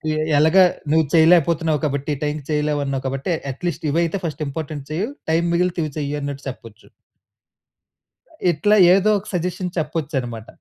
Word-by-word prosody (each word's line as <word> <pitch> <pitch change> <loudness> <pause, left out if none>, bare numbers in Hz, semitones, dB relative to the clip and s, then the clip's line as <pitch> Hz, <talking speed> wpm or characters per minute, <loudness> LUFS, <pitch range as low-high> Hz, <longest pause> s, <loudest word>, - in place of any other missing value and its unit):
"ఎ - - -2 0.2
ఎలాగా 160 +5 +6 0.3
నువ్వు 160 -1 +4
చేయలేకపోతున్నావ్. 165 -2 +4
కాబట్టి 140 +1 -2
ఈ - - -8
టైమ్‌కి 150 -1 -3
చేయలేవన్నావు, 145 -3 -1
కాబట్టి 135 +6 -3 0.2
ఎట్లీస్ట్ 165 +2 -4
ఇవి 165 - +1
అయితే 170 +4 -2
ఫర్స్ట్ 155 -1 -4
ఇంపార్టెంట్ 145 -1 -6
చెయు. 185 +8 -1 0.2
టైమ్ 170 +1 +2
మిగిలితే 180 0 0
ఇవి 150 - -4
చెయు" 145 0 -2
అన్నట్టు 140 0 -5
చెప్పొచ్చు. 115 -3 -12 1.6
ఇట్లా 205 +7 +2 0.2
ఏదో 195 +2 +3
ఒక 205 - -16
సజెషన్ 180 +1 -2
చెప్పొచ్చనమాట. 135 -8 -3
155 Hz, 145 wpm, -21 LUFS, 140-170 Hz, 1.6 s, ఎలాగా